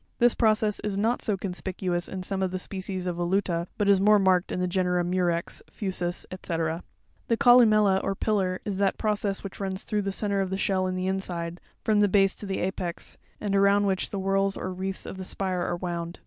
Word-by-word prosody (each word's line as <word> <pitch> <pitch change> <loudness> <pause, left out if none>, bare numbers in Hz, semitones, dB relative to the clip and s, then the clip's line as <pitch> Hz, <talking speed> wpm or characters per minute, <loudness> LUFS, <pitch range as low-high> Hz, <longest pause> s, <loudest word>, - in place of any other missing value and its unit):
'This 240 0 +4
process 215 -2 +2
is 205 -2 -3
not 225 +4 +1
so 210 -4 0
conspicuous 185 -1 -3
in 185 -1 -5
some 190 +1 -3
of 190 - +1
the 185 - -3
species 190 0 -4
of 175 -1 -2
Voluta, 175 -1 0
but 205 - +1
is 200 -1 +5
more 210 +1 +6
marked 185 -2 +2
in - - -2
the 180 - +1
genera 180 -1 +1
Murex, 175 -1 -1
Fusus, 180 -4 -3
&c. 185 -2 -4 0.7
The 230 - +2
columella 215 -5 +5
or 195 - -1
pillar, 190 -3 0
is 200 -2 -3
that 195 -1 +2
process 210 -2 -1
which 195 - -8
runs 190 -1 -3
through 210 -1 -1
the 195 0 -2
centre 200 0 +1
of 190 - -1
the 190 - -2
shell 190 -1 +1
in 185 - -2
the 185 0 -2
inside, 175 -3 -3 0.2
from 215 -1 +3
the 205 - +5
base 195 -1 +3
to 205 - -7
the 195 - -2
apex, 180 -2 -4 0.2
and 200 -1 -1
around 200 +1 +4
which 190 -2 0
the 200 - -4
whorls 195 0 +1
or 185 - -4
wreaths 190 +1 -4
of - - -7
the - - -4
spire 185 -1 -2
are 175 0 -1
wound 170 -1 -4
(fig. - - -28
190 Hz, 220 wpm, -27 LUFS, 185-200 Hz, 0.7 s, more